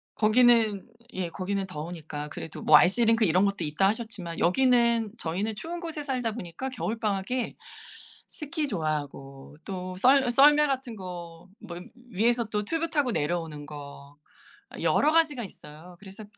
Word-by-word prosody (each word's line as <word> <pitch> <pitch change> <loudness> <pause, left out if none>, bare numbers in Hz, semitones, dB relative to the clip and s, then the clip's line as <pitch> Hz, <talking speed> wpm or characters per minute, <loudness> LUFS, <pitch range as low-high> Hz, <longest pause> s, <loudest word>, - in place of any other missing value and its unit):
거기는 225 -1 +3 0.3
예 185 -2 -3
거기는 195 +2 -3
더우니까 150 -3 -7
그래도 160 - -8
뭐 150 - +7
아이스링크 225 +6 +3
이런 185 +3 +3
것도 200 0 -1
있다 160 +6 +1
하셨지만 205 -6 -4
여기는 235 +1 +3
저희는 200 +6 -3
추운 340 +9 -6
곳에 325 -3 -5
살다 255 -5 -2
보니까 225 +5 -6
겨울방학에 225 0 -2 0.7
스키 305 0 -3
좋아하고 145 - -4
또 185 -1 -5
썰 265 +3 +4
썰매 295 +4 +6
같은 260 -4 -3
거 175 -2 -9 0.2
뭐 170 - -7 0.3
위에서 235 +4 +1
또 210 -1 -2
튜브 330 +6 -1
타고 290 -6 +1
내려오는 155 -2 -2
거 145 -1 -11 0.7
여러 305 +2 +3
가지가 305 -8 +2
있어요. 175 0 -13
그래서 205 +1 -11
205 Hz, 320 characters per minute, -27 LUFS, 170-245 Hz, 0.7 s, 뭐